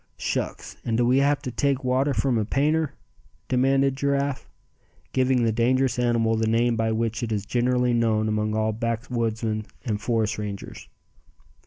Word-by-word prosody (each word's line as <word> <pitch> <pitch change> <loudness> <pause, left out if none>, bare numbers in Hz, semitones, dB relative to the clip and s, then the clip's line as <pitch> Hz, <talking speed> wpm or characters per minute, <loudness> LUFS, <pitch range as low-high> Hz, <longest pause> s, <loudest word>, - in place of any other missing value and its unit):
"Shucks! - - -3
and 115 -2 -1
do 120 - +3
we 125 +3 +4
have 145 +1 +2
to 130 - -4
take 135 +2 0
water 130 +3 +1
from 120 -1 +1
a - - +1
painter?" 145 +5 0 0.5
demanded 135 +1 +2
Giraffe, 140 0 -1 0.6
giving 130 -1 +2
the 115 - +2
dangerous 125 +2 +1
animal 115 -2 +2
the 110 0 0
name 115 +1 +2
by 110 0 0
which 115 0 -1
it 115 -2 -3
is 105 -2 -2
generally 125 +1 +1
known 110 -2 +2
among 105 0 0
all 110 0 +1
backwoodsmen 115 -1 -2 0.2
and 105 -4 -2
forest 110 -1 0
rangers. 100 -2 -6
120 Hz, 160 wpm, -25 LUFS, 110-130 Hz, 0.6 s, we